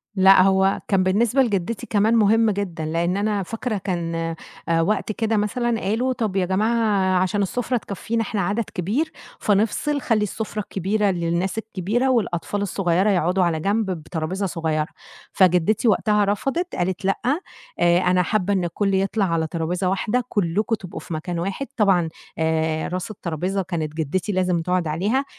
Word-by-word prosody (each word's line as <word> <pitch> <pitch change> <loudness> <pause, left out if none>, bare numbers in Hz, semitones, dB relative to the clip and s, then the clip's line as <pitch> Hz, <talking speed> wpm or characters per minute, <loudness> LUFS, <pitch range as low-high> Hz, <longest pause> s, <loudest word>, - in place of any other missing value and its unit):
لأ، 190 0 +7
هو 190 +1 +3
كان 195 -2 +2
بالنسبة 220 +8 +2
لجدّتي 210 -2 -1
كمان 215 +2 +2
مهم 225 +1 +4
جدًا 185 -6 -3
لإن 170 +4 0
أنا 205 -1 0
فاكرة 225 +3 -3
كان 175 -3 -3 0.5
آآ 165 0 +3
وقت 210 +5 0
كده 220 +1 0
مثلًا 230 +3 0
قالوا 230 +7 0
طَب 220 -6 -2
يا 190 -2 +2
جماعة 200 -1 +2
عشان 195 +2 0
السفرة 245 +5 -1
تكفّينا 225 +2 -3
إحنا 215 -2 -2
عدد 200 +6 0
كبير 220 - -1 0.3
فنفصل 220 +8 +1
خلّي 220 -4 +1
السفرة 215 +1 -4
الكبيرة 200 +1 0
للناس 170 +3 -1
الكبيرة 220 +4 -1
والأطفال 205 -4 0
الصغيّرة 190 0 +1
يقعُدوا 180 0 +2
على 165 -2 +1
جنب 200 +3 0
بترابيزة 170 +3 -3
صغيّرة، 160 -4 -1 0.4
فجدّتي 185 +4 +3
وقتها 210 0 +3
رفضت 270 - -1
قالت: 185 +1 -2
"لأ، 195 - +1 0.6
آآ 175 0 +4
أنا 180 0 +3
حابة 205 +2 0
إن 190 -2 +1
الكُلّ 195 +4 -1
يطلع 195 +2 +1
على 165 -3 0
ترابيزة 175 +3 -1
واحدة، 215 +6 0
كُلّكم 205 +4 0
تبقوا 185 -4 -8
في - - -8
مكان 170 +2 -3
واحد." 195 +10 -3
طبعًا 190 -6 +3 0.3
آآ 160 0 0
راس 185 +4 -4
الترابيزة 185 +1 -2
كانت 165 -5 -3
جدّتي 165 +5 -2
لازم 180 -3 +1
تقعد 180 0 0
عليها 205 - 0
195 Hz, 160 wpm, -22 LUFS, 175-215 Hz, 0.6 s, لأ